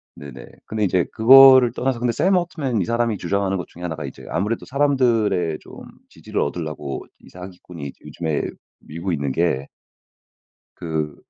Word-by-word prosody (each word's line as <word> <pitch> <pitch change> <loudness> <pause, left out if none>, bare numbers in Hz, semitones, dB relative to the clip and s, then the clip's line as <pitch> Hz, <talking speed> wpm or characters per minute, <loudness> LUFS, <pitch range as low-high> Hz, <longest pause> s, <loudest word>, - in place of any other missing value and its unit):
네네. 70 -3 -10 0.2
근데 110 -1 -3
이제 90 -3 +1
그거를 130 +1 +8
떠나서 130 -1 -2
근데 120 0 0
샘 190 +10 +2
올트먼 155 - -2
이 - - -1
사람이 115 -1 0
주장하는 95 +2 -1
것 90 - -6
중에 85 - -15
1 90 -2 -4
가 75 -2 -6
이제 65 - -10
아무래도 105 +4 -2
사람들의 115 - +1
좀 - - -16 0.4
지지를 - - -4
얻으려고 75 -3 -4 0.2
이 - - -18
사기꾼이 90 -5 -9
요즘에 80 -3 -3 0.4
밀고 85 +5 -5
있는 70 -4 -2
게 70 -3 0 1.1
그 80 -3 -4
95 Hz, 330 characters per minute, -21 LUFS, 80-120 Hz, 1.1 s, 그거를